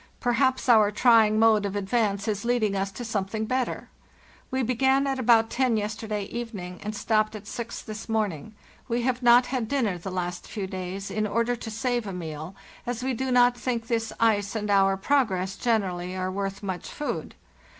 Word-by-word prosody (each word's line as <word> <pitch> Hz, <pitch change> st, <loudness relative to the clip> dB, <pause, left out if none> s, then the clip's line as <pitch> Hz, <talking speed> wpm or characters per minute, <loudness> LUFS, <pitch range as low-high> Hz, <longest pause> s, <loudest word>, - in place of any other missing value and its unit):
Perhaps 260 Hz, +2 st, +1 dB
our 220 Hz, -4 st, +6 dB
trying 220 Hz, -1 st, +4 dB
mode 220 Hz, -1 st, +5 dB
of 200 Hz, 0 st, -3 dB
advance 205 Hz, 0 st, 0 dB
is 205 Hz, -2 st, -1 dB
leading 235 Hz, -4 st, +1 dB
us 195 Hz, 0 st, -1 dB
to 240 Hz, +5 st, -7 dB
something 215 Hz, 0 st, -2 dB
better. 255 Hz, +2 st, -2 dB, 0.6 s
We 260 Hz, 0 st, 0 dB
began 265 Hz, +3 st, +2 dB
at 270 Hz, -1 st, -1 dB
about 225 Hz, -2 st, +4 dB
ten 255 Hz, -3 st, +2 dB
yesterday 210 Hz, 0 st, -3 dB
evening, 200 Hz, -5 st, -6 dB
and 210 Hz, +1 st, -4 dB
stopped 215 Hz, 0 st, +1 dB
at 210 Hz, -1 st, -9 dB
six 235 Hz, +2 st, -6 dB
this 215 Hz, +1 st, -8 dB
morning. 215 Hz, -4 st, -2 dB, 0.3 s
We 240 Hz, -1 st, -1 dB
have 255 Hz, 0 st, 0 dB
not 240 Hz, +1 st, +6 dB
had 250 Hz, -3 st, -2 dB
dinner 220 Hz, -9 st, 0 dB
the 190 Hz, -, -6 dB
last 180 Hz, -1 st, -4 dB
few 205 Hz, -3 st, -4 dB
days, 190 Hz, +1 st, -5 dB
in 215 Hz, 0 st, 0 dB
order 230 Hz, +3 st, 0 dB
to 225 Hz, -, -7 dB
save 240 Hz, 0 st, -1 dB
a 195 Hz, -, -4 dB
meal, 160 Hz, 0 st, -6 dB, 0.3 s
as 245 Hz, 0 st, -3 dB
we 260 Hz, 0 st, 0 dB
do 260 Hz, +2 st, -2 dB
not 245 Hz, 0 st, +5 dB
think 240 Hz, -2 st, -2 dB
this 225 Hz, -1 st, -1 dB
ice 210 Hz, -2 st, +2 dB
and 210 Hz, -1 st, -1 dB
our 195 Hz, -1 st, +4 dB
progress 195 Hz, -6 st, +1 dB
generally 185 Hz, -7 st, -1 dB
are 185 Hz, 0 st, -2 dB
worth 195 Hz, +1 st, -4 dB
much 190 Hz, -2 st, -4 dB
food. 295 Hz, -, -4 dB
220 Hz, 185 wpm, -26 LUFS, 195-240 Hz, 0.6 s, our